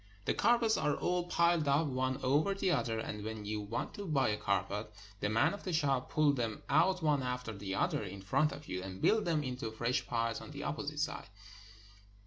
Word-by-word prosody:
The - - +2
carpets 235 -2 +3
are 150 - +1
all 180 0 0
piled 170 -3 +3
up, 140 +3 +3
one 130 -1 -1
over 145 +9 +2
the 195 -2 +1
other, 115 -8 0
and 105 -2 -4
when 110 -1 -5
you 105 0 -2
want 105 +3 -4
to 205 -2 -6
buy 140 -6 +2
a 105 - +1
carpet, 105 +1 -1 0.3
the 105 - 0
men 115 +10 +3
of 200 - -8
the 185 - -3
shop 140 -5 +1
pull 150 -2 +3
them 115 -5 -2
out 175 +6 +3
one 150 -3 +3
after 125 -2 -3
the 100 -1 -4
other - - +1
in 100 -1 -7
front 150 +10 +2
of 145 - -9
you, 90 0 -3
and 95 0 -7
build 215 - +3
them 160 -3 +1
into 125 -4 -3
fresh 120 +3 -1
piles 115 -1 -1
on - - -10
the 145 -1 -7
opposite 150 -2 -3
side. 155 -9 -3
135 Hz, 215 wpm, -33 LUFS, 110-160 Hz, 0.3 s, carpets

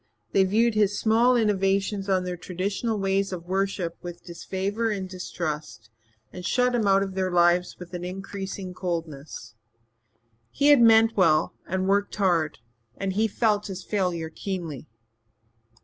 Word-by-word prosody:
They 190 - +4
viewed 225 +4 +2
his 205 -1 +2
small 230 +3 +4
innovations 200 -2 +1
on 185 -1 +2
their 180 0 -3
traditional 195 +6 -3
ways 195 0 0
of 175 -2 -6
worship 190 -2 -2
with 175 -1 -8
disfavour 195 +6 -3
and 195 -3 -3
distrust 155 - -5 0.4
and 180 - -8
shut 250 +7 +2
him 225 -4 +1
out 195 0 +4
of 195 -1 -5
their 185 0 -1
lives 175 0 +2
with 180 0 -11
an 175 0 -5
ever 180 +1 -4
increasing 195 -1 -6
coldness. 160 - -5 1.0
He 285 - +2
had 290 -4 +7
meant 225 0 +6
well 165 -6 +3
and 190 +1 -1
worked 200 +1 +1
hard 175 -7 +1 0.4
and 195 -1 -2
he 220 +3 +2
felt 210 -1 0
his 190 -2 -6
failure 175 -6 -2
keenly. 170 -6 -5
190 Hz, 150 wpm, -25 LUFS, 175-205 Hz, 1.0 s, had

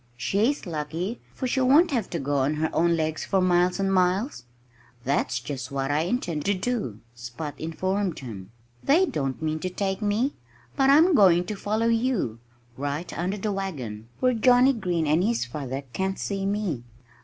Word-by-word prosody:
"She's 220 - 0
lucky, 170 +6 -4
for - - -5
she 260 +1 +1
won't 290 +7 +5
have 235 -8 -1
to 170 - -3
go 145 -1 -1
on 140 +3 +1
her 155 +1 -1
own 170 0 +3
legs, 160 0 -1
for 195 - +1
miles 180 0 +2
and 195 0 +1
miles." 185 - +1 0.6
"That's 130 -2 0
just 130 +2 -6
what 135 0 -1
I 145 - +2
intend 170 -4 -1
to 205 - +2
do," 185 - -3
Spot 120 +5 -6
informed 185 +3 -2
him. 100 -7 -8 0.3
"They 330 +7 +4
don't 135 - -3
mean 155 0 -1
to 185 - -3
take 190 +2 -2
me. 215 +7 +1 0.4
But 270 0 +3
I'm 320 +6 +6
going 180 - +5
to 210 - -4
follow 215 +3 -1
you, 230 - 0 0.4
right 145 +5 -4
under 185 +4 -2
the 210 +1 -2
wagon, 130 - -5
where 255 0 +3
Johnnie 250 +3 +5
Green 180 -8 -1
and 155 +4 +2
his 225 - +1
father 135 +1 -5
can't 190 0 -1
see 195 -1 -2
me." 200 - -1
180 Hz, 180 wpm, -26 LUFS, 150-215 Hz, 0.6 s, I'm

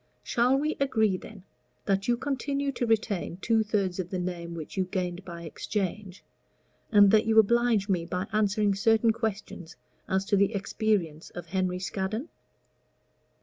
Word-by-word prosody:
Shall 245 +3 +2
we 305 +3 -1
agree, 220 -8 +2
then, 195 +1 -10 0.4
that 195 0 0
you 240 0 +2
continue 280 +1 -2
to 245 -2 -2
retain 210 -6 0
two 225 +3 +2
thirds 200 -4 -1
of 180 -2 -3
the 185 - -3
name 175 -2 -4
which 160 -2 -7
you 190 -1 0
gained 180 -1 -3
by 170 -2 -8
exchange, 195 +3 -4 0.7
and 205 -2 +7
that 220 0 +4
you 220 0 +2
oblige 225 -1 +4
me 175 -4 0
by 180 +2 -2
answering 210 -1 +2
certain 225 +3 +3
questions 215 -6 -5 0.3
as 190 +1 +1
to 200 - +2
the 200 +2 +2
experience 195 -6 -1
of 175 - -6
Henry 180 +1 -1
Scaddon?" 195 - -3
200 Hz, 155 wpm, -28 LUFS, 185-225 Hz, 0.7 s, and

